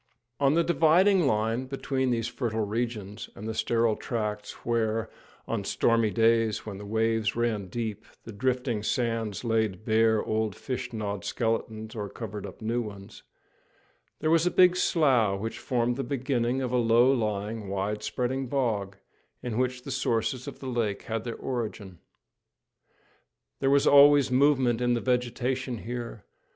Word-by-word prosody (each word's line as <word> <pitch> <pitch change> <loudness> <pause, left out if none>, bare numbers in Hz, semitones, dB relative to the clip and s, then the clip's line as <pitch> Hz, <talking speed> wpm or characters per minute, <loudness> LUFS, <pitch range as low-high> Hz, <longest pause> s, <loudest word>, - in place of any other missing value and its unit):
On 140 +1 +3
the 170 - +4
dividing 175 +2 +4
line 115 +2 0
between 135 -1 -1
these 115 -2 0
fertile 110 -4 -2
regions 110 -1 -4
and 105 - -7
the 110 - -2
sterile 115 0 +1
tracts 105 -3 -3
where, 115 -1 0 0.4
on - - -2
stormy 115 -2 +2
days 115 0 +2
when 100 -3 -6
the 100 - -8
waves 110 0 0
ran 115 -4 -1
deep, 110 0 -4 0.2
the 115 - -9
drifting 125 0 -1
sand 115 -2 -1
laid 110 -3 0
bare 110 0 +3
old, 110 -2 -1
fish 125 -1 -5
gnawed 105 -3 -4
skeletons, 110 0 -2
or 105 -3 -5
covered 105 -2 -6
up - - -12
new 115 +2 0
ones, 100 -3 -9 1.0
there 155 - +1
was 165 +1 +4
a - - +4
big 180 0 +5
slough, 125 - +2
which 110 +3 -5
formed 120 -1 0
the 135 - -2
beginning 130 -1 -1
of 125 - -2
a 125 - +2
low 120 +2 +4
lying, 105 -2 -2
wide 100 +2 -2
spreading 125 +5 -2
bog, 110 -7 -1 0.5
in 120 -3 -3
which 125 +1 -1
the 140 - -6
sources 125 0 -1
of - - -7
the 135 - -8
lake 115 -5 -1
had 115 0 -4
their 115 - -4
origin. 105 -8 -5 1.6
There 135 - +1
was 140 0 +4
always 145 -1 +7
movement 130 -3 +3
in 120 0 +2
the - - 0
vegetation 125 +1 -1
here. 120 -1 -6
115 Hz, 155 wpm, -27 LUFS, 110-130 Hz, 1.6 s, always